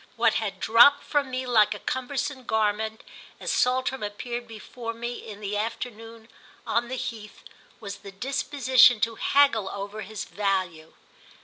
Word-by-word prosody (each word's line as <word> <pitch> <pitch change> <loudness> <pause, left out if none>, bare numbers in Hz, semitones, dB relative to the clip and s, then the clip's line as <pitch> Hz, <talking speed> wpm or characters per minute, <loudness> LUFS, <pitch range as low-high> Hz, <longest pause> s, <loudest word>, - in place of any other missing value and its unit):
What - - +3
had - - -4
dropped 240 +6 +6
from 290 -3 0
me 255 0 -3
like 220 -4 +3
a - - -8
cumbersome 260 +2 -3
garment 220 0 -1 0.4
as - - -3
Saltram 255 +1 +1
appeared 235 +4 -5
before 230 +1 -7
me 235 +1 -4
in 210 -1 -10
the 205 0 -3
afternoon 225 +1 -5 0.4
on 235 +2 0
the 260 - -4
heath 215 -4 -7 0.4
was 200 -3 -7
the 200 - -11
disposition 255 +1 +3
to 230 - +1
haggle 230 -5 +3
over 200 +2 -6
his 215 0 -6
value. 185 -6 -2
225 Hz, 145 wpm, -26 LUFS, 210-255 Hz, 0.4 s, dropped